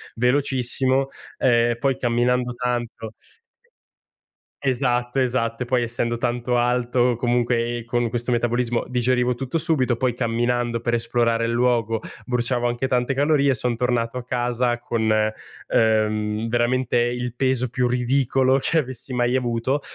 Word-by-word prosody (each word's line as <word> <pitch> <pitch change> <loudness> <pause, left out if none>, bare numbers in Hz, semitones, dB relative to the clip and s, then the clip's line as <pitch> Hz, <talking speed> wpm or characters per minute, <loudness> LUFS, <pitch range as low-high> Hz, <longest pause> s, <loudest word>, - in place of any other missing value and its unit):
velocissimo, 130 +1 +1 0.3
ehm, 120 -1 +3
poi 135 +1 +1
camminando 125 +1 +1
tanto 120 -2 -3 1.5
Esatto, 125 -1 0
esatto. 120 -2 0
E - - -4
poi 125 0 +1
essendo 120 0 -2
tanto 120 0 -1
alto 125 0 +1
comunque 120 -1 0
e 120 - -8
con 120 0 0
questo 120 +1 -2
metabolismo, 120 0 0
digerivo 125 0 +1
tutto 130 +5 -4
subito 150 -7 +1
poi 125 +1 0
camminando 120 0 -1
per 120 +1 -2
esplorare 115 0 +1
il 115 - -1
luogo 115 -2 +1 0.2
bruciavo 120 0 0
anche 120 +2 -1
tante 125 +1 0
calorie, 140 -1 +3
son 125 0 -1
tornato 120 0 -1
a - - -5
casa 120 -1 0
con, 115 -2 -1 0.6
ehm, 110 0 +1
veramente 120 +1 +1
il 120 0 -1
peso 130 0 0
più 125 0 0
ridicolo 130 +1 +2
che 165 - +1
avessi 130 -2 -4
mai 120 0 +1
avuto, 125 +2 0
120 Hz, 135 wpm, -22 LUFS, 120-125 Hz, 1.5 s, ehm